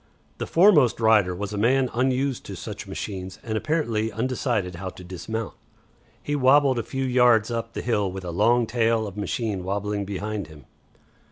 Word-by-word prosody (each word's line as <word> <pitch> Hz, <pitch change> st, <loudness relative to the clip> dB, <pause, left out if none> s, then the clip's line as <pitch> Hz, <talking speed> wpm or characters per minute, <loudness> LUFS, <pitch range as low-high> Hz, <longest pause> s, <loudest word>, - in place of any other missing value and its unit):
The -, -, -3 dB
foremost 165 Hz, -, +5 dB
rider 105 Hz, -5 st, +4 dB
was 100 Hz, +2 st, -5 dB
a 105 Hz, -, -2 dB
man 130 Hz, +4 st, +2 dB
unused 130 Hz, +2 st, 0 dB
to -, -, -6 dB
such -, -, -7 dB
machines 95 Hz, -2 st, -6 dB
and 110 Hz, -2 st, -3 dB
apparently 115 Hz, -5 st, -1 dB
undecided 115 Hz, -4 st, -1 dB
how 95 Hz, +1 st, -5 dB
to 90 Hz, -, -12 dB
dismount. 95 Hz, +5 st, -5 dB, 0.7 s
He 145 Hz, -, -1 dB
wabbled 135 Hz, -1 st, +4 dB
a -, -, 0 dB
few 135 Hz, +3 st, -3 dB
yards 125 Hz, -3 st, +4 dB
up 115 Hz, -1 st, -4 dB
the -, -, -4 dB
hill 105 Hz, -5 st, 0 dB
with 95 Hz, 0 st, -7 dB
a 85 Hz, -, -4 dB
long 115 Hz, +7 st, +3 dB
tail 115 Hz, -1 st, +1 dB
of 100 Hz, -2 st, -7 dB
machine 105 Hz, -1 st, -2 dB
wabbling 100 Hz, +1 st, -2 dB
behind 100 Hz, -1 st, -4 dB
him. 75 Hz, -3 st, -15 dB
110 Hz, 175 wpm, -24 LUFS, 100-125 Hz, 0.7 s, foremost